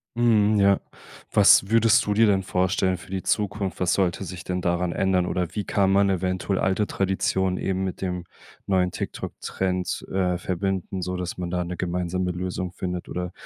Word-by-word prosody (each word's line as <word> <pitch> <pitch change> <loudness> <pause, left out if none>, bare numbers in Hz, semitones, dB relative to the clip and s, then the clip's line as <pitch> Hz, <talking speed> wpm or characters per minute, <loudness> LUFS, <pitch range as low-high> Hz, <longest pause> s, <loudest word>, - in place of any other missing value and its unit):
Mhm, 110 -3 +3
ja. 100 0 +4 0.5
Was 95 - +6
würdest 115 -1 +5
du 105 - 0
dir 115 +2 +5
denn 100 -3 +3
vorstellen 95 0 +1
für 95 - -14
die 95 -1 -2
Zukunft? 100 -3 -1
Was 90 -1 +2
sollte 95 0 0
sich 90 0 -7
denn 90 0 -3
daran 85 0 0
ändern? 95 0 +1
Oder 90 -1 -1
wie 105 - -2
kann 95 0 +1
man 100 0 +4
eventuell 95 +1 -1
alte 95 +2 +1
Traditionen 95 -1 0
eben 95 0 -1
mit 95 -2 -4
dem 90 -2 -3 0.4
neuen 90 -2 +1
TikTok - - -5
Trend, 90 -1 -2
äh, 90 -2 +1
verbinden, 95 +1 -2
sodass 90 0 -4
man 90 -1 -4
da 90 0 0
'ne 90 0 -6
gemeinsame 90 0 -1
Lösung 90 0 -4
findet 90 -1 -5
oder 90 0 -4
95 Hz, 180 wpm, -24 LUFS, 90-95 Hz, 0.5 s, Was